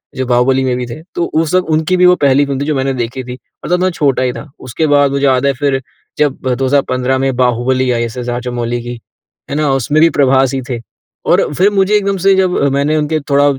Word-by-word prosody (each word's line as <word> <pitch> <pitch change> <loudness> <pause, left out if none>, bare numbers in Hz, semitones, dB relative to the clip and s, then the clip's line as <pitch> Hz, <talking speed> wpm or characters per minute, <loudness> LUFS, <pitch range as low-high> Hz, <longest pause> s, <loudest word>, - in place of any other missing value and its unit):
जो 130 - -2
बाहुबली 130 +2 +2
में 125 -1 0
भी 125 - -3
थे। 120 +6 -8
तो 170 - 0
उस 160 0 -1
वक़्त 185 -2 +1
उनकी 160 +4 +1
भी 180 - +4
वो 180 0 +6
पहली 140 0 +3
फ़िल्म 140 -1 -3
थी - - -1
जो 150 0 -1
मैंने 135 0 -1
देखी 125 +1 -4
थी। 125 0 -8 0.3
और - - -6
तब 180 - +2
मैं 185 - +2
छोटा 140 -6 0
ही 125 -1 -1
था। 145 +3 -10
उसके 155 +5 -2
बाद 145 -1 +3
मुझे 140 0 0
याद 130 -1 +2
है 140 - +2
फिर 135 0 -1 0.4
जब 145 -3 +1 0.2
2015 130 -1 0
में 135 -1 -1
Baahubali 125 +1 +1
I 120 -1 0
S. 115 +1 -6
S. 125 -1 -5
Rajamouli 120 -1 -3
की। 120 0 -7 0.5
है 140 - -3
ना? 150 -1 0
उसमें 140 +4 +1
भी 165 - +6
प्रभास 135 -3 +2
ही 135 - -2
थे 120 -2 -3 0.5
और - - +2
फिर 190 +6 +3
मुझे 195 0 +1
एकदम 200 -1 0
से 195 +1 +4
जब 185 -1 +1 0.2
मैंने 140 +2 +1
उनके 155 +1 0
थोड़ा 140 0 +3
135 Hz, 245 wpm, -14 LUFS, 125-155 Hz, 0.5 s, वो